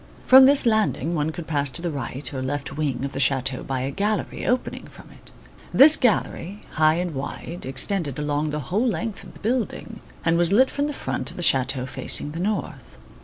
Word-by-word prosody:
From 260 0 +8
this 280 -1 +3
landing 215 -7 +1
one 150 -1 0
could 165 +1 -7
pass 145 -3 0
to 135 - +2
the 170 - -1
right 140 0 -4
or 130 - -4
left 140 +1 -4
wing 140 -3 -2
of 140 - -4
the 135 - -5
chateau 135 -1 +1
by 130 -2 -3
a 135 +2 -2
gallery 205 +5 -2
opening 250 0 -2
from - - -15
it. - - -14 0.4
This 295 +3 +8
gallery, 205 -4 -1
high 155 0 +3
and 175 -1 -2
wide, 145 +4 -6
extended 145 +1 0
along 150 +1 -1
the 150 0 -3
whole 225 +6 +2
length 210 0 -3
of - - -13
the - - -15
building 230 -1 -3 0.3
and 170 0 +2
was 175 +1 +1
lit 255 +6 +4
from 285 +1 -1
the 295 - -4
front - - -3
of - - -11
the 175 - -4
chateau 130 -3 +1
facing 145 +2 -3
the 165 - -6
north. 180 - -4
160 Hz, 210 wpm, -23 LUFS, 140-210 Hz, 0.4 s, From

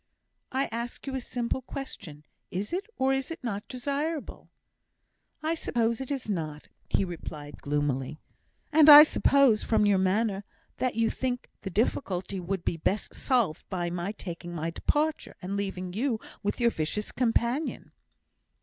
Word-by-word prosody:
"I 270 +1 +1
ask 235 +1 -5
you 270 - -4
a 265 - -2
simple 240 +1 -2
question; 195 - -8 0.2
is 195 - -3
it, 390 +4 -2
or 265 +1 +3
is 270 -1 -1
it 330 -3 -7
not 205 -4 -3
desirable?" 285 +4 -3 0.9
"I 320 +1 +1
suppose 235 -7 0
it 265 - -5
is 275 -5 -3
not," 155 -7 -4 0.2
he - - +2
replied, 150 -4 -8
gloomily. 145 -1 -1 0.5
"And 310 0 +7
I 295 0 +13
suppose, 275 -7 +4
from 215 -2 +2
your 200 -2 +4
manner, 195 +1 +1 0.3
that 255 -3 0
you 230 0 +2
think 250 -1 -3
the 195 - -4
difficulty 190 -2 -1
would 180 0 -3
be 165 - 0
best 195 +6 -1
solved 235 - 0
by 175 -3 -2
my 175 +3 -2
taking 175 -3 -7
my 165 +1 -2
departure, 305 - 0
and 190 +2 -4
leaving 185 -3 -3
you 230 +2 0 0.2
with 205 +3 -2
your 235 -1 +4
vicious 165 +6 -2
companion?" 245 +4 0
215 Hz, 155 wpm, -28 LUFS, 180-265 Hz, 0.9 s, I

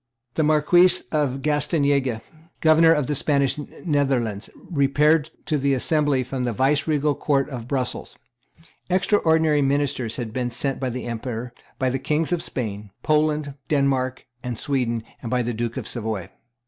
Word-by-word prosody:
The - - 0
Marquess 155 +4 +4
of 135 -4 0
Gastanaga, 140 -5 +1 0.4
Governor 160 +1 +5
of 150 -4 +2
the 150 - -1
Spanish 140 -1 +2 0.3
Netherlands, 130 - 0
repaired 150 0 +2 0.2
to 150 -2 0
the 140 0 +2
assembly 145 0 +2
from 125 +1 -4
the 120 - 0
viceregal 145 +4 +1
Court 140 -1 0
of 120 -4 -7
Brussels. 130 -2 -3 0.7
Extraordinary 160 -5 +3
ministers 135 -4 0
had 115 -3 -5
been 125 -1 -1
sent 130 +3 -2
by 130 - -1
the 125 0 -5
Emperor, 120 0 -5 0.2
by 130 -2 0
the 135 - -1
Kings 155 +5 0
of 175 -2 +1
Spain, 105 -4 -4
Poland, 150 -1 +1
Denmark, 135 -3 0 0.2
and 125 -2 -4
Sweden, 120 -5 -1 0.2
and 115 - -5
by 125 0 +1
the 120 +1 -2
Duke 115 +1 -3
of - - -4
Savoy. 110 -6 -4
140 Hz, 150 wpm, -23 LUFS, 125-150 Hz, 0.7 s, Governor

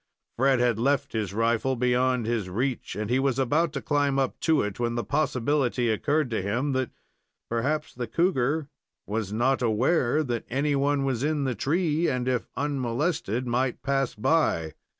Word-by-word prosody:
Fred 130 +1 +3
had 120 -3 +2
left 140 +2 +1
his 105 -4 -2
rifle 115 +4 +1
beyond 125 0 +1
his 110 -5 -1
reach, 125 +7 -2
and 105 0 -3
he 125 +4 +2
was 135 -2 +1
about 145 +5 +2
to - - -4
climb 145 -2 +1
up 135 -2 -1
to 160 -3 +2
it, 105 0 -4
when 120 -1 -1
the 120 - -1
possibility 135 -2 0
occurred 145 +4 0
to 110 - 0
him 120 +9 -1
that, 130 -2 0 0.6
perhaps, 145 +6 -1
the 120 -1 -4
cougar 155 - +1 0.4
was 105 -1 -3
not 130 +5 +1
aware 125 +5 +2
that 120 -5 -3
any 140 +3 +1
one 140 0 +1
was 130 -2 -1
in 150 -1 0
the 130 -2 0
tree, 160 - 0
and, 125 -1 -1
if 125 -2 0
unmolested 135 - -1
might 125 +1 -1
pass 135 -3 0
by. 105 - +1
130 Hz, 170 wpm, -26 LUFS, 115-145 Hz, 0.6 s, Fred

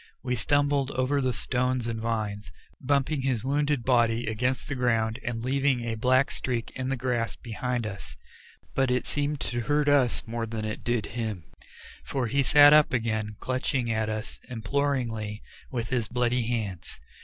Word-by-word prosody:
We 125 -1 0
stumbled 145 +3 +2
over 135 +2 0
the 130 -1 +1
stones 125 0 -1
and 115 -1 -3
vines, 105 -4 -3 0.3
bumping 140 +1 +1
his 130 -5 0
wounded 145 -1 +1
body 120 -2 +2
against 125 +4 -1
the 145 - -2
ground 115 -3 +1
and 115 -1 -3
leaving 135 -1 +2
a 115 -1 -2
black 130 +4 +3
streak 120 -3 -3
in 130 0 -4
the 135 - -1
grass 120 -2 -1
behind 120 +1 -3
us, 100 -2 -7 0.6
but 135 -1 +2
it 125 0 +1
seemed 145 0 -1
to 120 0 -2
hurt 145 +4 +1
us 140 -4 +3
more 115 0 -3
than 110 -1 -4
it 110 - -4
did 120 -3 0
him, 110 -7 -3 0.6
for 135 -3 -2
he 140 +5 +1
sat 145 +2 +8
up 150 -1 +6
again 110 -3 -1
clutching 130 -2 -1
at 110 -1 0
us 110 0 -5
imploringly 115 -3 -2 0.3
with 115 -3 -3
his 120 -4 0
bloody 125 -1 0
hands. 105 -7 -3
125 Hz, 165 wpm, -27 LUFS, 115-135 Hz, 0.6 s, sat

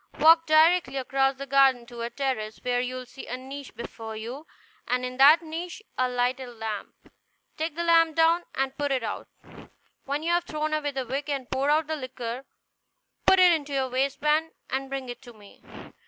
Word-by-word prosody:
Walk 325 +2 +6
directly 315 -2 +4
across 270 +1 +1
the 275 +1 -7
garden 270 -3 +4
to 240 -1 -9
a 235 - -2
terrace, 240 -6 -3
where 245 -1 +1
you 250 +1 -3
will 255 0 -6
see 265 +2 -11
a 250 - -4
niche 270 +1 -9
before 225 -1 -7
you, 245 +8 -7 0.4
and 250 +1 0
in 250 0 -6
that 295 +5 +7
niche 340 +5 -6
a 255 0 +1
lighted 250 +1 -1
lamp. 220 -2 -7 0.4
Take 315 0 -3
the 340 - -2
lamp 330 -2 +4
down, 330 +1 +4
and 270 0 -1
put 285 0 -2
it 260 -3 0
out. 210 - -4 0.8
When 285 +2 -2
you 335 - 0
have 345 0 +1
thrown 310 -1 -3
away 305 -1 0
the 270 -2 -4
wick 275 +4 -4
and 275 -3 -2
poured 270 +2 0
out 305 +1 +3
the 315 +1 -3
liquor, 255 -2 -6 0.8
put 380 - +7
it 365 -1 +7
in 320 -3 +1
your 270 -2 -1
waistband 300 +5 0 0.2
and 270 +1 -2
bring 270 -1 -4
it 245 - -7
to 245 -3 -13
me. 205 -2 -17
270 Hz, 200 wpm, -26 LUFS, 250-310 Hz, 0.8 s, that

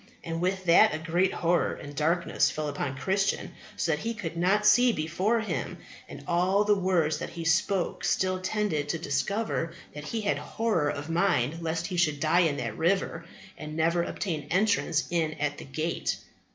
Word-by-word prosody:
And 165 -1 -4
with 185 +1 -1
that 175 +3 +6
a - - -2
great 170 +4 +1
horror 170 0 +1
and 145 0 -10
darkness 165 +4 +1
fell 155 -1 -3
upon 140 -2 -3
Christian, 195 +7 0 0.2
so 165 - 0
that 150 - 0
he 230 +5 -3
could 170 -7 -5
not 190 +5 +2
see 245 +3 +6
before 185 +7 0
him; 220 - -3 0.3
and - - -9
all 185 +4 +2
the 210 0 +4
words 180 -5 +1
that - - -5
he 170 -1 -7
spoke 170 +3 +1
still 185 0 +1
tended 185 -7 -1
to 165 - 0
discover 195 0 -1 0.2
that 150 0 -8
he 225 +8 -3
had 205 - 0
horror 215 -10 0
of 145 +3 -4
mind 165 -4 +1
lest 165 +1 -2
he 180 - -4
should 155 -4 +2
die 155 +4 +3
in 160 -5 +2
that 115 -4 -4
river 170 -1 0 0.3
and 155 0 -6
never 170 +2 +2
obtain 160 -4 -3
entrance 185 -4 +2
in 160 -2 0
at 150 -1 -2
the - - -8
gate. 155 +5 -2
170 Hz, 185 wpm, -28 LUFS, 155-195 Hz, 0.3 s, that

